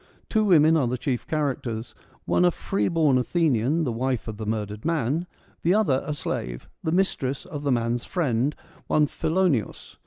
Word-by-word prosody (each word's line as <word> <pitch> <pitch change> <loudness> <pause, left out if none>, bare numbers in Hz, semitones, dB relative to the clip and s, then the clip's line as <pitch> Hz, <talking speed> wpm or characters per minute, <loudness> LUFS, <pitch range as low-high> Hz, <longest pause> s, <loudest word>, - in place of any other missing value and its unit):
Two 215 -1 +2
women 160 -4 +6
are 135 -5 +2
the 125 +2 -1
chief 125 -1 -2
characters: 125 -7 -2 0.3
one - - +2
a 180 - +6
free 195 +3 -1
born 155 -6 +3
Athenian, 150 +1 +1
the 130 - -1
wife 125 +1 -2
of 110 -1 -5
the 110 -1 -5
murdered 105 -1 -3
man; 160 +1 0 0.3
the 175 +4 +3
other 160 -12 +2
a 150 - -2
slave, - - -4 0.2
the 160 - 0
mistress 150 -7 0
of 150 -5 -6
the 145 -1 0
man's 120 0 0
friend, 140 -5 0 0.3
one 150 - +3
Philo 180 +6 +1
neos. 125 - -2
140 Hz, 180 wpm, -25 LUFS, 120-165 Hz, 0.3 s, women